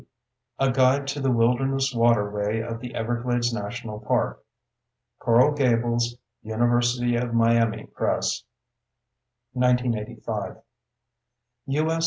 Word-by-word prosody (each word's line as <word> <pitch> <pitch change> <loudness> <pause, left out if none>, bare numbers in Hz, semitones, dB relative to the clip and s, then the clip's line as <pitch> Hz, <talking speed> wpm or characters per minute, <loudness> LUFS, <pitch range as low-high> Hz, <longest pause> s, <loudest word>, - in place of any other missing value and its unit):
A 135 -1 +2
Guide 130 +2 +3
to 145 +1 -3
the 135 - +1
Wilderness 130 +3 +1
Waterway 105 -2 +1
of 115 0 -5
the 125 0 -8
Everglades 120 +1 -1
National 110 0 -5
Park. 120 +2 -1 0.8
Coral 120 +5 +4
Gables: 120 -3 +1 0.3
University 120 +2 +1
of 120 -1 -2
Miami 115 -1 +2
Press, - - -1 1.1
1985. 125 -3 -1 1.1
U.S. 155 +4 0
120 Hz, 95 wpm, -25 LUFS, 115-125 Hz, 1.1 s, Coral